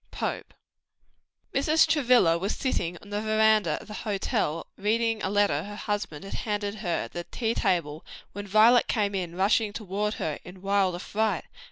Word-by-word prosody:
POPE. - - -4 1.0
Mrs. 310 +4 +4
Travilla 250 - +4
was 195 +4 -2
sitting 175 -10 -2
on 205 - -14
the 205 +1 -1
veranda 215 -6 +3
of - - -14
the 210 - -8
hotel, 195 -6 -2
reading 225 +1 0
a 190 - -1
letter 205 0 +2
her 205 +1 -8
husband 200 -6 -4
had 195 - -8
handed 205 -2 -2
her 180 -5 -1
at - - -9
the 175 0 -5
tea 230 -2 -2
table, 160 -7 -1 0.3
when 205 +1 -7
Violet 220 +4 +5
came 205 -2 0 0.2
rushing 205 +3 +2
toward 210 0 -3
her 155 -2 -3
in 180 +1 -12
wild 195 -2 +2
affright. 210 +4 -1
205 Hz, 165 wpm, -27 LUFS, 190-220 Hz, 1.0 s, Violet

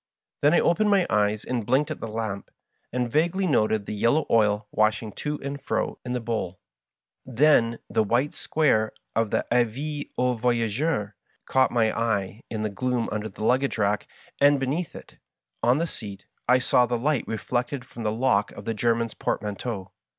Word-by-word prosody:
Then 145 +4 +5
I - - +5
opened 210 +5 +3
my 195 -3 +4
eyes 105 0 +1
and 125 -3 -2
blinked 135 +8 +1
at 155 - -5
the - - -5
lamp, 110 -3 -4 0.4
and 125 0 0
vaguely 175 +6 +2
noted 110 - +2
the - - -4
yellow 120 +9 +2
oil 105 -2 +3
washing 110 0 +1
to 150 +7 -4
and 140 +1 -5
fro - - -2
in 125 - -4
the 125 - 0
bowl. 110 -6 -3 0.6
Then 125 -3 +3
the - - +1
white 120 +7 +1
square 110 -9 +1 0.2
of 115 -1 +1
the - - 0
" - - -41
Avis 135 +5 0
aux 125 0 +2
Voyageurs 120 0 0 0.2
" - - -42
caught 130 0 +4
my 110 -2 +1
eye 105 -2 -1
in 110 -1 -3
the 110 - 0
gloom 125 +2 -1
under 105 +1 -3
the 105 - -8
luggage 130 +4 +2
rack, 105 -1 0 0.3
and 145 0 +6
beneath 145 +6 -2
it,' - - -12 0.4
on 120 +3 +4
the 165 - +1
seat, 100 - -8 0.2
I 125 +1 +6
saw 125 -1 +3
the 120 0 0
light 140 +1 0
reflected 125 +4 -2
from 120 - -10
the 110 -1 0
lock 110 -3 +1
of 100 - -10
the 115 - -1
Grerman's 115 +1 0
portmanteau. 105 -1 -3
120 Hz, 185 wpm, -25 LUFS, 110-135 Hz, 0.6 s, and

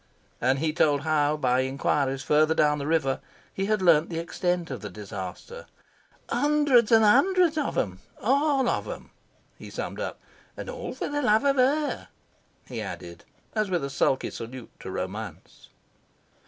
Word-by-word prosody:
And 130 +2 +3
he 155 +2 0
told 145 -3 +3
how, 150 -1 +1
by 125 -3 +2
inquiries 135 0 0
further 155 +1 +3
down 150 -1 +3
the 140 - -4
river, 150 -5 +1 0.3
he 195 0 -2
had 215 -2 +1
learned 165 -3 +5
the 165 - -4
extent 175 0 -2
of 130 - -5
the 105 - -6
disaster. 100 - -8 0.6
"Hundreds 290 -6 +3
and 225 -1 +6
hundreds 360 - +4
of 300 -3 -1
them 95 -2 -1 0.2
ALL 275 +1 +2
of - - 0
them," - - -8 0.5
he - - -9
summed - - -5
up. - - -4 0.4
"And - - -5
all - - -6
for - - -3
the 290 0 -2
love 220 -1 +3
of 275 -1 +3
HER," 285 +4 +1 0.6
he - - -6
added, - - -8 0.3
as 215 -2 0
with 175 -5 0
a 140 - -3
sulky 135 -1 +1
salute 120 +1 -8
to - - -8
Romance. 95 0 -6
160 Hz, 165 wpm, -26 LUFS, -, 0.6 s, and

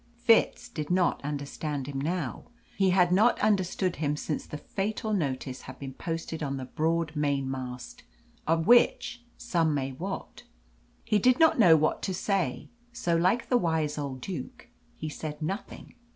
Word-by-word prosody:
Fitz 235 -2 +3
did 150 -3 -5
not 180 -4 +2
understand 145 0 -4
him 135 -1 -4
now; 160 -3 -3 0.3
he 195 -1 +3
had 180 -1 +4
not 215 +6 +4
understood 190 -3 +1
him 150 -1 -1
since 150 0 -3
the 150 - -6
fatal 210 +6 -3
notice 135 -7 -2
had - - -10
been 135 -1 -7
posted 165 +2 -4
on 140 -2 -2
the 130 - -5
broad 160 +3 -1
mainmast, 135 -4 -3 0.5
of 165 0 +2
which 240 +1 +4 0.2
some 165 -9 +1
may 135 -1 -2
wot. 185 +9 -6 0.6
He 215 -2 +2
did 250 +4 +4
not 320 -5 +5
know 175 -7 +8
what 155 0 +1
to 190 - -2
say, 180 -9 -1 0.2
so, 235 -9 0
like 185 +8 +2
the 250 - +4
wise 160 -6 0
old 135 -3 -4
Duke, 160 -7 -7 0.3
he 155 - -5
said 150 0 -6
nothing. 185 +7 -5
165 Hz, 160 wpm, -28 LUFS, 145-195 Hz, 0.6 s, know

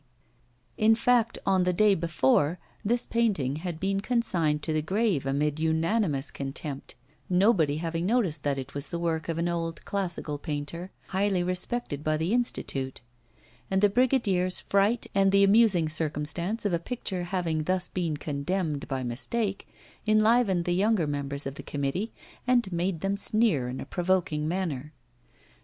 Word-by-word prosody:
In 220 +1 +5
fact, 235 0 +2
on 190 -1 +3
the 180 0 +2
day 210 +3 +4
before, 155 -2 +2 0.3
this 235 +3 0
painting 190 - 0
had 165 -1 -5
been 195 +1 0
consigned 175 - +1
to 160 - -1
the 155 - +1
grave 190 - 0
amid 145 +2 0
unanimous 160 -1 +1
contempt, 140 0 -5 0.3
nobody 180 -6 +3
having 165 +1 -2
noticed 215 -9 +1
that 140 -1 0
it 135 +1 -6
was 145 0 -4
the 170 - -3
work 165 -1 -2
of 165 - -1
an 170 +1 0
old 165 -1 -3
classical 175 -7 -2
painter 155 +4 -4 0.2
highly 195 -1 +1
respected 180 - -2
by 155 0 +1
the 165 +7 -1
Institute; 135 - -2 0.7
and 190 - +2
the 205 +1 +5
brigadier's 205 -6 +2
fright, 200 +4 +1
and 195 0 +4
the 200 0 +5
amusing 200 -5 +5
circumstance 155 +7 -2
of 200 - +1
a 170 - +2
picture 185 -3 -4
having 170 -4 -1
thus 185 0 0
been 170 -5 -2
condemned 150 +1 -2
by 135 -2 -2
mistake, 195 - -2 0.4
enlivened 215 -4 +3
the 175 - +1
younger 200 -1 +2
members 140 -1 -2
of 135 - -3
the - - -8
committee 145 +10 -2 0.4
and 240 -6 +2
made 175 -1 -1
them 195 +1 0
sneer 200 - +2
in 130 - -5
a - - -5
provoking 175 -4 0
manner. 155 -5 -3
175 Hz, 155 wpm, -27 LUFS, 150-200 Hz, 0.7 s, In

